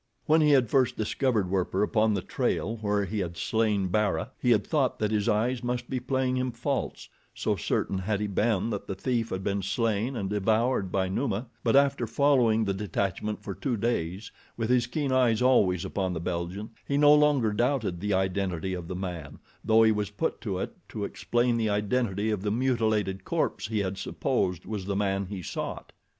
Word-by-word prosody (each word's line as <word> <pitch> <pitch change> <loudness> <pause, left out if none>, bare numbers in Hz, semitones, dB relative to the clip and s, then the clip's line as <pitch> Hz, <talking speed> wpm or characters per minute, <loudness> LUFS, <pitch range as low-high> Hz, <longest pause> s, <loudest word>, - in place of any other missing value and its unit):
When 160 +1 +4
he 150 - +4
had 135 -4 +5
first 130 -3 +2
discovered 110 -3 0
Werper 95 +1 +1
upon 110 0 +2
the 95 - -2
trail 115 +3 -1
where 105 -2 0
he 105 +3 -3
had 85 -3 -4
slain 105 -4 +1
Bara, 105 +4 0
he 125 - +1
had 110 -4 +4
thought 140 -6 +1
that 105 -1 -1
his 105 +1 +1
eyes 120 +4 +1
must 120 0 -3
be 130 - 0
playing 130 0 0
him 130 0 -1
false, 130 +4 -3 0.3
so - - 0
certain 95 - -1
had 100 +2 -1
he 105 - -1
been 105 +1 0
that 100 - -4
the 95 - -3
thief 115 +2 -1
had 95 0 -4
been 100 0 -1
slain 110 +5 -1
and 100 -5 -2
devoured 105 0 +1
by 95 -1 +1
Numa; 110 +3 -1 0.2
but 115 - +2
after 140 -3 +3
following 115 -3 +3
the 100 - 0
detachment 100 +1 -2
for 100 - -4
two 125 +3 -2
days, 100 -3 -2 0.3
with 115 +1 -1
his 120 -1 +3
keen 140 +2 -2
eyes 125 -4 +3
always 100 -8 +3
upon 95 -1 -2
the 80 - -3
Belgian, 90 +5 -4 0.2
he 140 - +1
no 145 0 +7
longer 145 -7 +3
doubted 120 -6 0
the 105 +1 0
identity 95 -1 -1
of 90 -2 -5
the 95 - -5
man, 85 -6 -5 0.3
though 110 0 +5
he 110 - +5
was 105 -2 -1
put 105 +1 -3
to 100 -5 -3
it - - -4
to - - -4
explain 120 0 0
the 110 -2 0
identity 105 0 0
of 105 -3 -1
the 105 - -1
mutilated 110 -5 0
corpse - - -1
he 110 0 -2
had 95 -1 -2
supposed 90 -2 -1
was 105 -4 -4
the 100 0 -2
man 100 -1 0
he 95 -2 -6
sought. - - -5
105 Hz, 200 wpm, -27 LUFS, 95-120 Hz, 0.3 s, no